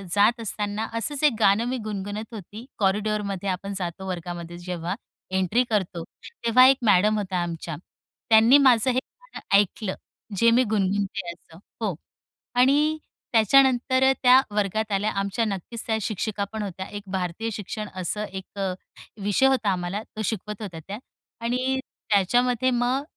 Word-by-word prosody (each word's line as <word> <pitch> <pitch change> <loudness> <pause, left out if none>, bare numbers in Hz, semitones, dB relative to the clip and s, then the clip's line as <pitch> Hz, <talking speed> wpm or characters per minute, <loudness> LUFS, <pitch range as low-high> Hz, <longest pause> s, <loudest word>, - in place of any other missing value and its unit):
जात 215 +4 +4
असताना 210 0 -3
असंच 270 +6 -3
एक 300 -4 +5
गाणं 210 +2 +4
मी 260 - -1
गुणगुणत 205 +3 -5
होती. 215 +2 -9
कॉरिडोअरमध्ये 200 -1 0
आपण 195 +2 -3
जातो 185 +1 -5
वर्गामध्ये 175 -1 -5
जेव्हा 175 0 -4 0.4
एन्ट्री 190 +7 +2
करतो 190 -6 -1 0.4
तेव्हा 245 +2 +7
एक 270 0 +5
मॅडम 210 +1 +4
होत्या 190 -3 -2
आमच्या, 165 -1 -5 0.5
त्यांनी 225 +4 +7
माझं 260 -4 +5
हे 250 - +1
गाणं - - -14 0.2
ऐकलं, 205 0 -1 0.4
जे 230 +4 +5
मी 245 +2 +5
गुणगुणते 200 -3 -1
असं 165 -1 -19 0.2
हो. 205 -6 -1 0.6
आणि 290 +5 +4 0.4
त्याच्यानंतर 260 +3 +4 0.2
त्या 255 +1 +8
वर्गात 210 +1 0
आल्या. 205 +2 +1
आमच्या 200 +3 -1
नक्कीच 215 +3 -5
त्या 220 -1 +1
शिक्षिका 210 0 -2
पण 220 -1 -3
होत्या. 190 -1 -5
एक 205 -1 -7
भारतीय 185 +4 -2
शिक्षण 210 +1 -5
असा 190 +3 -3
एक 190 0 -9
अ, 190 -2 0 0.5
विषय 205 +6 +2
होता 260 -6 +2
आम्हाला, 180 +2 -2
तो 220 - -8
शिकवत 210 0 -4
होत्या 180 -6 -6
त्या. 200 +2 -5 0.4
आणि 255 +3 0 0.3
त्याच्यामध्ये 245 +5 +3
मग 245 +3 +1
210 Hz, 150 wpm, -25 LUFS, 190-235 Hz, 0.6 s, त्या